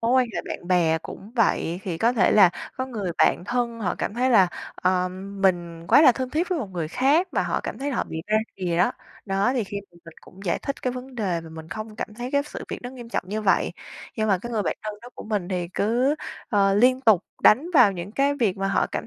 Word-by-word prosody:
mối 230 +2 +1
quan 255 -1 +4
hệ - - -1
bạn 175 - -6
bè 165 -3 +3
cũng 205 +6 -10
vậy, 185 -5 +1
thì 170 -4 -4
có 235 +2 +3
thể 225 - +3
là 195 -4 +7 0.3
có 260 - -2
người 210 -8 -4
bạn - - +3
thân 235 +1 -2
họ 180 -4 -1
cảm 205 - -2
thấy 255 +2 +1
là, 195 -6 +6 0.3
à, 185 0 +1
mình 185 -3 -2
quá 290 - +6
là 260 -5 +8
thân 255 +1 -4
thiết 330 +4 0
với 365 -3 0
một 250 - -3
người 170 -4 -3
khác 280 - +2
mà - - +1
họ - - -1
cảm - - -5
thấy 280 +2 -2
là 255 - -2
họ - - 0
bị 160 - -4
ra 215 - +2 0.2
rìa 180 -3 -1
á. 180 - +3 0.3
Đó, 195 +5 +1
thì 240 -4 0
khi 200 +1 -6
mà - - -28
mình 165 - -12
cũng 190 - -16
giải 170 - 0
thích 275 - -5
cái 255 - 0
vấn 255 +1 -8
đề 190 -7 -1
và 165 - -11
mình 160 0 -10
không 215 +4 -7
cảm 215 - -5
thấy 245 +3 -5
cái 285 0 +3
sự 295 - -8
việc - - -4
nó 245 - -6
nghiêm 245 -3 -10
trọng 230 - -2
như 215 +2 -3
vậy. 195 - +2 0.4
Nhưng 215 -1 0
mà 195 -2 +3
cái 235 +6 -7
người 215 -2 0
bạn - - -2
thân 215 -1 -4
đó 245 - -10
của - - -9
mình 205 -5 -2
thì 180 -2 -2
cứ, 245 +7 +2 0.3
ờ, 195 -2 +3
liên 255 +5 +4
tục 220 -8 +4 0.2
đánh 260 +10 +6
vào 245 -8 +7
những 185 +2 -7
cái 280 +3 +2
việc 220 -8 0
mà 195 0 -1
họ 195 - +2
cảm - - -5
210 Hz, 270 wpm, -24 LUFS, 185-250 Hz, 0.4 s, là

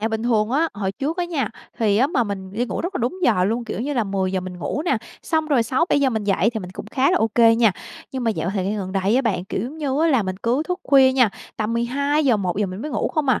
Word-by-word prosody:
À, 220 - 0
bình 220 0 -2
thường 225 -2 +1
á, 310 +6 +2
hồi 195 -1 -2
trước 295 +7 -3
á 355 - 0
nha, 300 -10 -1 0.3
thì 210 -3 +2
á, 250 +5 +4
mà 260 -5 +1
mình 190 -2 -6
đi 235 +4 -1
ngủ - - -3
rất 365 +3 -4
là - - -1
đúng 245 +11 -2
giờ 215 - +3
luôn. 230 +4 -1
Kiểu 215 - -4
như 285 +4 -2
là, 235 -5 +1
10:00 190 -1 -1
mình 180 -1 -7
ngủ 280 - -3
nè, 305 -8 +2 0.3
xong 315 -2 0
rồi 280 -6 +3
6:00-7:00 270 +3 +2
mình 220 -3 -2
dậy 200 +2 +2
thì 225 -2 -4
mình 180 -2 -8
cũng 190 - -8
khá 260 +5 +1
là - - +3
OK 220 +1 -1 0.2
nha. 225 -3 +4 0.4
Nhưng 260 -2 -3
mà 225 - +2
dạo 190 -4 -2
thời 190 -3 -1
gian 205 +3 -1
gần 190 -1 -5
đây 195 +4 +1
á 265 - +2
bạn, 195 -7 -1
kiểu 190 - -3
giống 280 +7 -6
như 285 -1 -1
á, 330 - +4
là 265 -7 +3
mình 185 -1 -4
cứ 240 +8 0
thức 360 +1 -2
khuya 265 -2 +5
nha, 250 -5 +4 0.3
tầm 215 +1 -1
12:00-1:00 235 - +1
mình 185 +3 -6
mới 305 - -4
ngủ 235 - -1
không 305 -3 -1
à. 255 - +3
235 Hz, 285 wpm, -22 LUFS, 200-275 Hz, 0.4 s, khuya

